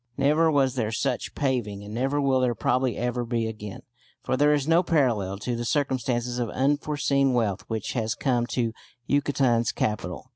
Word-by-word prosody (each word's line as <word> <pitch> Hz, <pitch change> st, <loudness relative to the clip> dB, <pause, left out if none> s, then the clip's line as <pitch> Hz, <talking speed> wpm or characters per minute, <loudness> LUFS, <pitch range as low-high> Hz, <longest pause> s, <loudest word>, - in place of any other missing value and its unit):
Never 150 Hz, +4 st, +3 dB
was 135 Hz, -4 st, +2 dB
there 115 Hz, -4 st, -1 dB
such 110 Hz, -, -2 dB
paving, 120 Hz, -8 st, -1 dB
and 105 Hz, +1 st, -8 dB
never 135 Hz, +5 st, 0 dB
will 135 Hz, -2 st, +2 dB
there 125 Hz, -2 st, +1 dB
probably 130 Hz, +2 st, 0 dB
ever 125 Hz, 0 st, -1 dB
be 115 Hz, -1 st, -1 dB
again, 105 Hz, -3 st, -7 dB, 0.4 s
for -, -, 0 dB
there 145 Hz, +3 st, +4 dB
is 145 Hz, -1 st, +1 dB
no 165 Hz, +2 st, +5 dB
parallel 120 Hz, -, +1 dB
to 120 Hz, +4 st, -3 dB
the 120 Hz, -, -3 dB
circumstances 125 Hz, -2 st, -1 dB
of 120 Hz, -2 st, -1 dB
unforeseen 140 Hz, 0 st, +1 dB
wealth 110 Hz, -6 st, 0 dB
which 110 Hz, -2 st, -3 dB
has 110 Hz, -3 st, -1 dB
come 120 Hz, -3 st, 0 dB
to 115 Hz, -3 st, -1 dB, 0.3 s
Yucatan's 135 Hz, -5 st, +2 dB
capital. 105 Hz, -3 st, -3 dB
125 Hz, 175 wpm, -26 LUFS, 115-140 Hz, 0.4 s, no